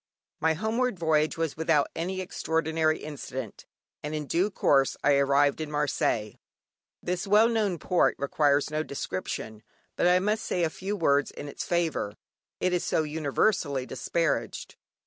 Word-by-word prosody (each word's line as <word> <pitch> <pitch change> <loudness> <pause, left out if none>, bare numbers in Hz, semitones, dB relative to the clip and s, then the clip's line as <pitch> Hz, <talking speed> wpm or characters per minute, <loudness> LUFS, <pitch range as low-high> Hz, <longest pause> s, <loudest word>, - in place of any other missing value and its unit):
My 160 0 +2
homeward 225 +4 -1
voyage 155 -2 +1
was 165 -3 -1
without 160 -2 +2
any 185 +3 -2
extraordinary 160 -2 0
incident, 130 -6 -7 0.3
and 150 +1 -4
in 150 -1 -3
due 175 +8 +1
course 140 -8 +2
I 145 - +5
arrived 140 +2 +3
at 155 - -4
Marseilles. 140 -7 -1 0.7
This 180 +2 -2
well 210 +3 +6
known 215 -6 0
port 180 +2 +2
requires 140 +1 +1
no 155 0 0
description, 110 -5 -5 0.3
but - - +2
I 180 0 +5
must 210 +4 0
say 175 - -1
a 160 - +1
few 195 +4 -4
words 140 -7 +2
in 145 - -8
its 145 - -6
favour; 165 -12 -1 0.4
it 185 - +1
is 175 - +1
so 160 - +1
universally 150 -1 0
disparaged. 165 +4 -2
160 Hz, 150 wpm, -27 LUFS, 145-180 Hz, 0.7 s, well